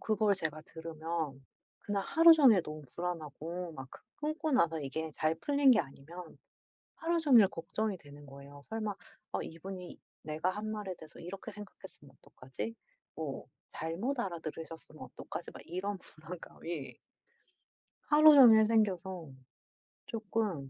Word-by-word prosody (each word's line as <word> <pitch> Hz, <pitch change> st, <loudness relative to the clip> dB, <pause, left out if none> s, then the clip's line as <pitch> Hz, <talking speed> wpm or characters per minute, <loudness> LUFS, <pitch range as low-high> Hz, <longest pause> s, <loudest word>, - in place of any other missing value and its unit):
그걸 215 Hz, -2 st, +2 dB
제가 155 Hz, -4 st, -3 dB
들으면 160 Hz, -3 st, -4 dB, 0.4 s
그날 205 Hz, -1 st, -2 dB
하루 330 Hz, +9 st, +7 dB
종일 255 Hz, -, +6 dB
너무 155 Hz, -1 st, -7 dB
불안하고 170 Hz, 0 st, -4 dB
막 135 Hz, -3 st, -8 dB
그 -, -, -12 dB, 0.3 s
끊고 310 Hz, 0 st, -1 dB
나서 165 Hz, -10 st, +3 dB
이게 155 Hz, +3 st, -4 dB
잘 155 Hz, +2 st, +1 dB
풀린 280 Hz, -, +4 dB
게 225 Hz, -, +6 dB
아니면 160 Hz, +4 st, -10 dB, 0.6 s
하루 335 Hz, +1 st, 0 dB
종일 255 Hz, -10 st, +7 dB
걱정이 195 Hz, +4 st, -3 dB
되는 145 Hz, -2 st, -14 dB
거예요. 140 Hz, +1 st, -12 dB
'설마 215 Hz, -2 st, -2 dB, 0.4 s
어 -, -, 0 dB
이분이 180 Hz, +2 st, -8 dB, 0.2 s
내가 155 Hz, +4 st, -1 dB
한 215 Hz, +2 st, -4 dB
말에 210 Hz, -3 st, -4 dB
대해서 160 Hz, -1 st, -14 dB
이렇게 195 Hz, +5 st, -7 dB
생각했으면 195 Hz, -8 st, -11 dB
어떡하지?' 130 Hz, -, -7 dB, 0.4 s
뭐 155 Hz, -4 st, -5 dB, 0.2 s
'잘못 195 Hz, -, -3 dB
알아들으셨으면 165 Hz, -4 st, -6 dB
어떡하지?' -, -, -7 dB
막 -, -, -11 dB
이런 195 Hz, +4 st, -3 dB
불안감이 165 Hz, -2 st, -8 dB, 1.1 s
하루 305 Hz, +1 st, +8 dB
종일 225 Hz, -5 st, +9 dB
생겨서 190 Hz, -6 st, +1 dB, 0.8 s
쪼끔 215 Hz, -, -2 dB
180 Hz, 295 characters per minute, -33 LUFS, 155-215 Hz, 1.1 s, 종일